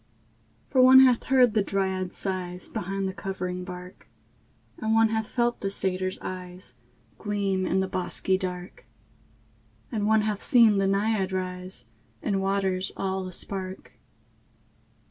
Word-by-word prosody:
For 260 - +4
one 260 +1 +9
hath 255 -3 +4
heard 255 -4 +4
the 215 - +3
dryad's 190 -2 -2
sighs 180 -2 -4
Behind 195 +2 -3
the 190 - -4
covering 185 -2 -4
bark; 180 0 -10 0.7
And 220 0 +1
one 225 0 +5
hath 220 -1 -1
felt 240 -1 0
the 195 - -1
satyr's 185 -1 -2
eyes 180 -5 -8 0.5
Gleam 200 -3 -1
in 190 - +1
the 190 - -1
bosky 185 0 0
dark; 180 -6 -6 1.0
And 210 -2 -1
one 220 0 +4
hath 210 -1 -2
seen 225 -5 +5
the 195 - +2
naiad 200 -1 +1
rise 185 -6 -5 0.4
In 195 -2 0
waters 195 -1 0
all 190 -1 -2
a - - -7
spark. 190 +1 -5
190 Hz, 140 wpm, -26 LUFS, 185-210 Hz, 1.0 s, one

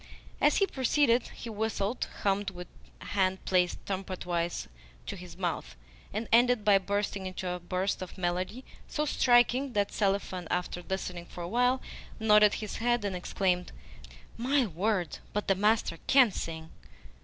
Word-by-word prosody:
As - - +4
he 395 - +4
proceeded 260 -5 +2
he - - -10
whistled, 220 0 -2 0.2
hummed 200 0 +1
with 180 -1 -9 0.3
hand 190 -1 0
placed 180 -1 +1
trumpetwise 180 -3 -3 0.4
to - - -5
his 180 -1 -11
mouth, 165 - -3 0.4
and 225 +1 -3
ended 240 -1 +4
by 200 -2 +6
bursting 200 0 -2
into 185 0 -5
a 180 0 -2
burst 185 +3 -2
of 185 - -7
melody 185 +7 -2 0.2
so 300 - -1
striking 250 -1 +3
that 205 -1 +1
Selifan, 195 -3 -1
after 180 0 -2
listening 180 -2 -4
for 175 - -8
a - - -4
while, 250 +5 +2 0.4
nodded 210 -1 +6
his 215 - -5
head 240 -1 +1
and 195 -2 -2
exclaimed, 180 0 -1 0.7
"My 260 +3 +2
word, 185 -1 -1
but 210 - -2
the 195 - +5
master 210 -3 +1
CAN 260 -5 +6
sing!" 160 -3 -5
200 Hz, 150 wpm, -30 LUFS, 180-230 Hz, 0.7 s, by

